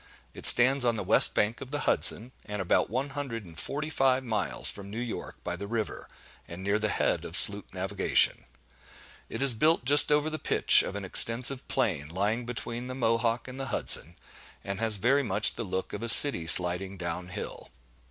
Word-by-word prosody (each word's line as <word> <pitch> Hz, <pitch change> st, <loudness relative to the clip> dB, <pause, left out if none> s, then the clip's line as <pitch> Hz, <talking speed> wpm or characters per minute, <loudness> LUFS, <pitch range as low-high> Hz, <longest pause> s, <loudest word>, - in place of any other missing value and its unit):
It -, -, +4 dB
stands 130 Hz, +2 st, +6 dB
on 120 Hz, -2 st, -1 dB
the 105 Hz, -, -6 dB
west -, -, +1 dB
bank 110 Hz, +3 st, -2 dB
of 130 Hz, -, -10 dB
the 145 Hz, +1 st, -6 dB
Hudson, 120 Hz, -3 st, -1 dB, 0.2 s
and 105 Hz, 0 st, -7 dB
about 95 Hz, -2 st, -1 dB
one 130 Hz, +5 st, -5 dB
hundred 135 Hz, -6 st, -8 dB
and 85 Hz, -2 st, -16 dB
forty 150 Hz, -, -7 dB
five 135 Hz, -2 st, -1 dB
miles 110 Hz, -5 st, -5 dB
from 100 Hz, -1 st, -9 dB
New 105 Hz, -, -10 dB
York 120 Hz, -2 st, -8 dB
by 90 Hz, -, -6 dB
the 100 Hz, +3 st, -9 dB
river, 110 Hz, -1 st, -6 dB, 0.4 s
and 85 Hz, +2 st, -11 dB
near 100 Hz, +2 st, -2 dB
the 105 Hz, 0 st, -3 dB
head -, -, -3 dB
of -, -, -5 dB
sloop -, -, +4 dB
navigation. -, -, -1 dB, 0.8 s
It -, -, -6 dB
is 135 Hz, -3 st, +2 dB
built 155 Hz, +4 st, -1 dB
just 145 Hz, +3 st, +7 dB
over 150 Hz, +1 st, -1 dB
the 155 Hz, -, -6 dB
pitch -, -, +3 dB
of -, -, -8 dB
an 100 Hz, -1 st, -7 dB
extensive 125 Hz, +7 st, +3 dB
plain, 90 Hz, -, -4 dB
lying 105 Hz, +7 st, -4 dB
between 120 Hz, 0 st, -7 dB
the 130 Hz, -, -8 dB
Mohawk 115 Hz, -1 st, -2 dB
and 130 Hz, +1 st, -11 dB
the 135 Hz, -, -7 dB
Hudson, 85 Hz, +3 st, -1 dB, 0.5 s
and 100 Hz, 0 st, -7 dB
has 110 Hz, -2 st, -1 dB
very 130 Hz, +8 st, 0 dB
much 105 Hz, -4 st, +1 dB
the -, -, -8 dB
look 95 Hz, -2 st, -7 dB
of 105 Hz, -, -8 dB
a 115 Hz, -, -5 dB
city 115 Hz, -, +8 dB
sliding 90 Hz, +3 st, +3 dB
down 90 Hz, 0 st, -7 dB
hill. 90 Hz, -, -10 dB
115 Hz, 200 wpm, -25 LUFS, 100-130 Hz, 0.8 s, city